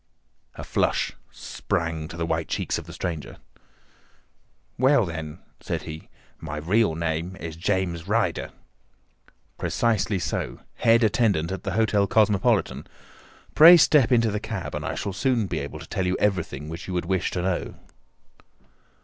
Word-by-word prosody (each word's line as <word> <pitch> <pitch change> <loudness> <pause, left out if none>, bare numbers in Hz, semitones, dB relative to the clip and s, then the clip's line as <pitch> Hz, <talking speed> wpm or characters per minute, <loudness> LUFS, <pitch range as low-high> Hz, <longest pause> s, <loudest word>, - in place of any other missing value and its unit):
A - - -7
flush - - 0 0.2
sprang 80 -2 -3
to 85 - -9
the 85 - -1
white - - -1
cheeks - - -2
of - - -11
the - - -9
stranger. 85 -5 -5 1.4
"Well 130 -3 +4
then," 80 -3 -6 0.2
said - - -4
he, 80 0 -9 0.3
"my 75 -1 -6
real 90 +3 +1
name 85 +2 -2
is 85 -4 -7
James 90 -1 -1
Ryder." 105 -5 0 1.1
"Precisely 110 -3 0
so. 90 - -3 0.2
Head 115 +1 +4
attendant 100 -6 +2
at 95 -2 -4
the 95 - -2
Hotel 105 -1 +2
Cosmopolitan. 105 -4 +2 0.7
Pray 170 +3 +10
step 145 -5 +4
into 115 -3 +3
the 105 - -2
cab, 110 -4 -5
and - - -4
I - - -3
shall 100 - -3
soon 120 +2 +1
be - - -3
able - - -6
to - - -11
tell 95 - -2
you 90 - 0
everything 85 -8 -1
which 80 +2 -7
you 95 - -4
would 90 - -1
wish 95 0 0
to 90 - -3
know." 90 -2 -2
95 Hz, 155 wpm, -25 LUFS, 85-110 Hz, 1.4 s, Pray